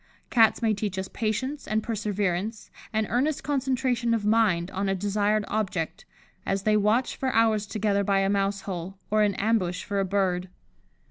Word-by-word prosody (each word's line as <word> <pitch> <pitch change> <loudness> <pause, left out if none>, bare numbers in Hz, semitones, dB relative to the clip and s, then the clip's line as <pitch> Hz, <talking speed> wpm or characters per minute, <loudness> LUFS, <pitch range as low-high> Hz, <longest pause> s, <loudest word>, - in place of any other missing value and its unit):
Cats 225 0 +4
may 220 -1 +3
teach 205 -2 -3
us 190 0 -2
patience, 235 +8 -3
and 215 0 0
perseverance, 210 -1 -2 0.2
and 220 -1 +1
earnest 270 +5 0
concentration 255 -4 0
of 210 -2 -3
mind 210 -5 +2
on 195 +1 -1
a 195 - +1
desired 205 +2 +1
object, 195 -6 -2 0.4
as 195 0 -1
they 215 +1 +3
watch 215 +5 +2
for 260 -1 -1
hours 220 -2 +3
together 205 -2 0
by 195 0 +2
a 195 - +2
mouse 200 0 0
hole, 190 0 -6
or 215 0 +3
in 205 -2 +2
ambush 195 -4 0
for 200 -1 -2
a - - +2
bird. 185 -2 0
210 Hz, 175 wpm, -26 LUFS, 195-225 Hz, 0.4 s, Cats